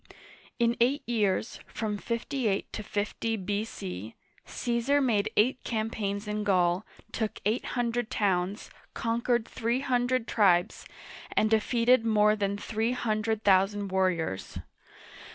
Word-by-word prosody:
In 235 0 +2
eight 270 +5 +3
years 215 -3 0
— - - -36
from 210 -2 -3
58 235 -2 -2
to - - -4
50 215 +2 -2
B.C. 180 - -4 0.3
^ - - -16
Caesar 240 +4 +1
made 220 -7 +1
eight 250 +5 +3
campaigns 215 -2 -2
in 210 0 -2
Gaul, 180 -1 +2 0.3
took 220 -2 -3
eight 220 +4 +1
hundred 240 -1 0
towns, 195 -4 -1 0.2
con 230 -1 -1
quered 240 -2 +1
three 235 +3 -1
hundred 250 -2 0
tribes, 180 -5 +2 0.5
and 215 - +3
defeated 230 +2 +3
more 210 -1 +4
than 200 -1 -1
three 220 +3 -1
hundred 220 -2 -1
thousand 195 +1 +3
warriors. 185 - -1
215 Hz, 130 wpm, -28 LUFS, 200-235 Hz, 0.5 s, more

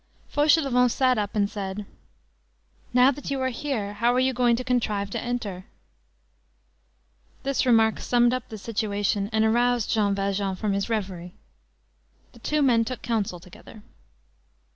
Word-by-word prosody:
Fauchelevent 285 -5 +3
sat 255 -1 +2
up 205 0 -3
and 205 -1 +2
said:— 200 0 -5 1.1
"Now 250 +2 +5
that 285 +1 -7
you 275 -1 -1
are 260 0 0
here, 235 -6 -3
how 230 +4 +2
are - - +3
you 260 0 +2
going 240 -1 +3
to 250 - -4
contrive 215 -5 -1
to - - -3
enter?" 210 -7 -4 1.8
This 275 -1 0
remark 225 -2 +4
summed 240 0 +2
up 255 - -4
the 220 - -7
situation 205 -2 -1
and 220 0 +2
aroused 240 +1 +2
Jean 205 -2 +2
Valjean 195 -1 -1
from 200 +2 -2
his 200 +3 -2
reverie. 185 -5 -4 1.0
The 235 - -17
two 300 +5 0
men 235 -4 +4
took 250 +1 -6
counsel 210 -7 -2
together. 185 +4 -15
225 Hz, 150 wpm, -25 LUFS, 200-250 Hz, 1.8 s, Now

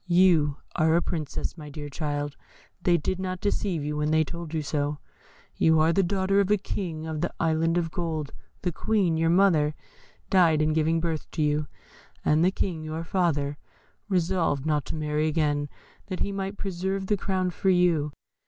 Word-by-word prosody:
You 170 -5 +4 0.2
are 160 0 +3
a 170 - +4
Princess, 155 -5 -3
my 150 -1 -8
dear 145 0 -7
child; 145 -1 -3 0.5
they 175 -1 +4
did 185 +4 -2
not 185 -1 -3
deceive 195 -5 -1
you 150 +1 -2
when 150 0 0
they 160 0 +4
told 170 +1 -7
you 160 -2 -1
so; 145 0 -1 0.6
you 160 -1 +4
are 160 +2 +4
the 195 - +4
daughter 195 +1 +1
of 200 - +3
the 210 +1 +3
King 170 -5 -4
of 160 -1 -3
the 175 - -1
Island 165 +1 +2
of 165 -2 -1
Gold; 160 -4 -3 0.3
the 180 - 0
Queen, 190 -2 +1
your 165 0 +2
mother, 165 -5 +4 0.6
died 170 -5 +5
in 155 0 +2
giving 160 +1 +2
birth 160 -2 -2
to 155 - 0
you, 150 0 +1 0.6
and 155 +2 +4
the 180 - +5
King, 175 -4 -2
your 155 +1 -4
father, 150 -5 0 0.5
resolved 175 -6 +1
not 150 -3 +1
to - - -5
marry 150 0 0
again, 145 -2 0 0.4
that 185 -2 -5
he 200 - 0
might 195 0 -4
preserve 190 0 -2
the 210 - +2
crown 185 -2 -1
for 190 - 0
you. 175 -5 +3
165 Hz, 185 wpm, -26 LUFS, 150-185 Hz, 0.6 s, died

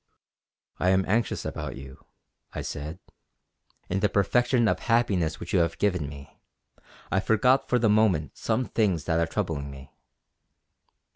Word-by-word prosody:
"I 90 - +2
am 95 0 +3
anxious 110 +4 0
about - - -5
you" 65 -1 -11 0.5
I - - -4
said. 75 +4 -5 0.9
"In 95 - -1
the 105 - +2
perfection 120 +5 +2
of - - +1
happiness 100 - +1
which - - -7
you - - +4
have 85 -1 0
given 90 -8 0
me, 70 -1 -12 0.7
I 95 - +2
forgot 120 +6 +2
for 125 - +3
the 115 -2 +2
moment 105 -9 +2
some 115 +3 -1
things 95 -11 0
that 80 +1 0
are 85 - +1
troubling 80 -7 -3
me." 70 -1 -11
95 Hz, 150 wpm, -26 LUFS, 80-110 Hz, 0.9 s, you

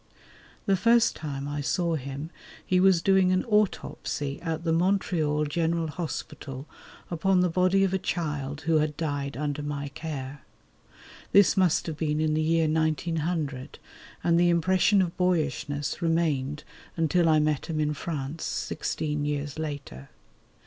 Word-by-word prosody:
The 195 - +3
first 230 +4 +4
time 140 -3 -5
I 145 0 -3
saw 170 +3 0
him 140 +2 -5 0.3
he 185 - +2
was 185 -2 +4
doing 190 -1 +4
an 185 0 +1
autopsy 190 -9 -1
at 165 -1 -3
the 165 -1 +1
Montreal 165 -4 +1
General 165 +1 0
Hospital 145 -4 -6 0.5
upon 180 +2 +2
the 180 -2 +2
body 185 +2 +3
of 190 -1 +1
a 190 - +1
child 150 -5 -3
who 160 +1 +2
had 150 -1 -1
died 145 -4 -3
under 145 0 -2
my 145 -1 -4
care. 140 -2 -6 0.9
This 200 -1 +6
must 185 -4 +2
have 160 -3 -4
been 150 -1 0
in 155 -1 +1
the 155 - +1
year 165 0 +2
1900, 155 -2 -1 0.5
and 170 0 +3
the 175 0 +4
impression 185 +3 +3
of 170 -2 -4
boyishness 150 -5 -1
remained 150 -4 0 0.3
until 165 +1 +3
I 155 - +5
met 150 -2 0
him 160 -2 -2
in 150 0 +1
France 150 0 -5
sixteen 150 -1 -2
years 145 0 -3
later. 145 - -6
160 Hz, 150 wpm, -27 LUFS, 145-175 Hz, 0.9 s, This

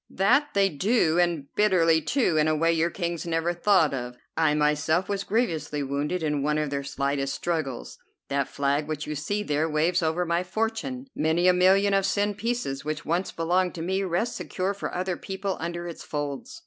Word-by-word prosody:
"That 260 +10 +2
they 195 -1 +4
do, 175 - +2
and 170 -5 +1
bitterly, 170 -6 +3
too, 235 - +1
in 155 0 +3
a 155 - +2
way 165 +2 +2
your 165 +1 +1
kings 170 -1 -3
never 165 +1 0
thought 175 -4 +3
of. 125 -2 -5 0.2
I 160 -2 +2
myself 150 +4 +1
was 200 -1 -2
grievously 165 - -1
wounded 145 +5 -2
in 150 -2 0
one 150 +2 +1
of 150 -2 -1
their 140 -1 -2
slightest 140 0 -2
struggles. 155 -8 -3 0.3
That 140 -1 0
flag 140 +1 0
which 155 -1 -3
you 150 - -4
see 205 +8 -2
there 155 -3 0
waves 165 +4 +1
over 165 +2 0
my 170 +1 +1
fortune. 225 +7 -3
Many 160 +3 +2
a 180 - +6
million 190 +3 +4
of 195 0 +2
sen 205 0 +1
pieces 220 - -3
which 155 +1 -4
once 175 +4 -1
belonged 180 +2 0
to 165 - -4
me 190 +3 0
rest 195 +6 -1
secure 190 +2 -2
for 200 - -5
other 180 0 -2
people 195 0 -4
under 170 +1 -4
its 170 - -8
folds." 145 - -5
170 Hz, 195 wpm, -26 LUFS, 150-190 Hz, 0.3 s, a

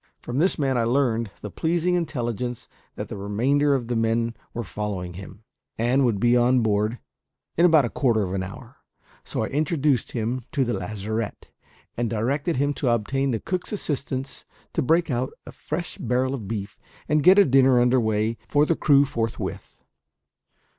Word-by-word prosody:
From 120 +3 -3
this 185 +5 +2
man 135 -4 +1
I - - +2
learned 115 -2 +1
the 105 - -6
pleasing 170 - 0
intelligence 125 - -2 0.3
that - - -5
the - - -6
remainder 130 +9 +1
of 120 -4 -3
the 120 - -1
men 115 +1 +1 0.2
were 120 - -4
following 95 -2 -4
him, 100 +4 -11 0.3
and 125 +4 +2
would 115 -6 +1
be 120 +3 +4
on 125 +1 +4
board 105 +1 +1 0.6
in 170 +2 +5
about 155 -5 +5
a - - -2
quarter 115 -6 +2
of 95 -1 -3
an 95 - -1
hour; 95 +1 -9 0.5
so - - -3
I - - -1
introduced 145 -2 0
him 120 +2 -2
to 140 -4 +2
the 120 - -1
lazarette, 105 +3 -4 0.5
and 120 -1 -1
directed 140 +9 -1
him 145 +2 +1
to 130 - +2
obtain 135 +4 0
the 115 -3 0
cook's 185 - -4
assistance 140 -8 -4 0.3
to - - +1
break 165 +3 +2
out 125 +1 -1
a - - -9
fresh 165 +3 -5
barrel 125 +2 0
of 115 -8 -5
beef, 105 -1 -5 0.3
and 150 +1 +2
get 185 +5 +7
a 200 - +7
dinner 130 -2 +5
under 125 +1 +4
way 110 0 0
for 145 +1 +4
the 165 - +1
crew 145 -2 +4
forthwith. 115 -4 -4
125 Hz, 180 wpm, -24 LUFS, 110-140 Hz, 0.6 s, get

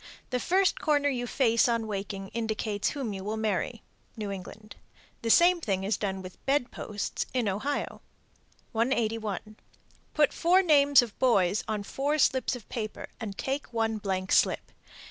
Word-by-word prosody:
The 250 - 0
first 375 +7 +2
corner 290 -2 +2
you 245 -3 -2
face 230 -2 +3
on 230 -1 0
waking 195 -2 -5
indicates 220 -2 -1
whom 260 -7 -4
you 190 -1 -6
will 215 +2 -3
marry. 220 +2 -2 0.3
(New 210 -2 -4
England.) 205 +3 -9 0.5
The 230 - -2
same 345 +7 +6
thing 195 -8 -1
is 205 +3 +1
done 190 -2 -3
with 185 - -7
the - - -26
bed 270 -2 +1
posts 210 -1 -4
in 245 -4 +1
Ohio. 215 +9 -2 0.7
181. 220 -3 -1 0.6
Put 300 -2 +4
four 365 +3 +4
names 285 -5 +6
of 225 -4 -9
boys 205 -6 +3
on 215 -2 -2
four 285 +8 -1
slips 265 -3 +2
of 235 -4 -11
paper 215 -3 -5
and 205 -3 -6
take 270 0 -3
one 225 -2 0
blank 190 -2 -2
slip. - - +2
225 Hz, 165 wpm, -28 LUFS, 205-270 Hz, 0.7 s, same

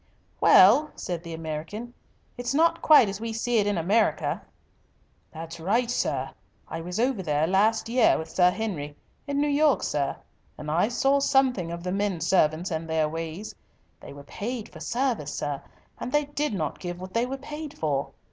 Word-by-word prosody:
"Well," 250 +12 +6
said 175 -2 -4
the 170 -1 -7
American, 165 +9 -6 0.4
"it's 245 +2 -3
not 330 +2 +3
quite 300 -8 +7
as 195 +1 -5
we 230 0 -3
see 230 +1 +1
it 205 - +1
in 205 -2 0
America." 205 +7 +1 0.9
"That's 165 +1 -8
right, 230 +8 +1
sir. 135 - -1 0.4
I 165 - -5
was 180 +4 -5
over 245 -3 +1
there 150 -3 +1
last 210 +6 +2
year 240 0 +4
with 160 - -5
Sir 180 -1 +4
Henry 180 -9 -4 0.3
in 285 0 -1
New 295 - +2
York, 290 0 +3
sir, 140 -2 -1 0.4
and 150 0 -5
I 175 +6 +2
saw 270 +4 +2
something 260 - +2
of 170 0 -6
the 180 - -2
men 200 -2 -1
servants 170 +1 +2
and 160 0 -3
their 160 -1 +1
ways. 165 +5 -6 0.5
They - - -11
were 140 0 -11
paid 225 - -5
for - - -12
service, 240 - -1
sir, 145 -2 -3 0.4
and 245 - -5
they 295 +1 +2
did 290 -4 -2
not 155 -5 -3
give 175 -1 -6
what 185 0 -9
they 235 +2 +1
were 270 +1 -4
paid 295 +2 -8
for. 140 -3 -1
195 Hz, 185 wpm, -26 LUFS, 160-245 Hz, 0.9 s, quite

